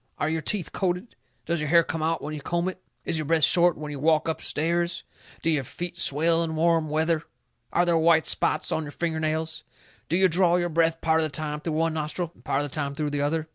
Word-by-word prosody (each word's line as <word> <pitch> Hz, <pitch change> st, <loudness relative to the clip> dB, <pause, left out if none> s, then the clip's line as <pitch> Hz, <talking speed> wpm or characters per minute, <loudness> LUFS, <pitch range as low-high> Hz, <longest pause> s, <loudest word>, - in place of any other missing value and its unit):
Are 155 Hz, -, -1 dB
your 160 Hz, 0 st, -1 dB
teeth 175 Hz, +1 st, -2 dB
coated? 185 Hz, +4 st, -2 dB, 0.3 s
Does 170 Hz, -1 st, -1 dB
your 150 Hz, -1 st, -2 dB
hair 170 Hz, +1 st, +6 dB
come 165 Hz, -1 st, -4 dB
out 165 Hz, +1 st, -1 dB
when 150 Hz, +1 st, -4 dB
you 150 Hz, -, -6 dB
comb 175 Hz, +4 st, -1 dB
it? 185 Hz, 0 st, -5 dB, 0.2 s
Is 160 Hz, -, 0 dB
your 155 Hz, -, -3 dB
breath 160 Hz, +1 st, +2 dB
short 175 Hz, +1 st, +5 dB
when 150 Hz, 0 st, -6 dB
you 145 Hz, -, -5 dB
walk 155 Hz, +2 st, +2 dB
up 160 Hz, -, -2 dB
stairs? 170 Hz, +3 st, -1 dB, 0.4 s
Do 165 Hz, -, +2 dB
your 145 Hz, -4 st, +1 dB
feet 175 Hz, +7 st, -5 dB
swell 165 Hz, +2 st, +2 dB
in 160 Hz, -1 st, -3 dB
warm 165 Hz, -1 st, +2 dB
weather? 160 Hz, +1 st, +1 dB, 0.5 s
Are 175 Hz, -, +2 dB
there 170 Hz, -1 st, +2 dB
white 160 Hz, 0 st, +4 dB
spots -, -, 0 dB
on 160 Hz, -, 0 dB
your 150 Hz, -2 st, -7 dB
finger 165 Hz, -2 st, -2 dB
nails? 160 Hz, +1 st, -2 dB, 0.5 s
Do 170 Hz, -, +2 dB
you 190 Hz, 0 st, +6 dB
draw 175 Hz, 0 st, +3 dB
your 175 Hz, -1 st, 0 dB
breath 165 Hz, 0 st, +1 dB
part 160 Hz, 0 st, +2 dB
of 160 Hz, -, +2 dB
the -, -, -2 dB
time 150 Hz, 0 st, -4 dB
through 160 Hz, 0 st, -3 dB
one 165 Hz, +1 st, +1 dB
nostril 160 Hz, +2 st, -3 dB
and -, -, -23 dB
part 140 Hz, +2 st, 0 dB
of 145 Hz, -, -4 dB
the -, -, -12 dB
time 140 Hz, -2 st, -3 dB
through 150 Hz, 0 st, -2 dB
the 145 Hz, -1 st, -1 dB
other? 155 Hz, +2 st, -1 dB
160 Hz, 250 wpm, -25 LUFS, 155-170 Hz, 0.5 s, hair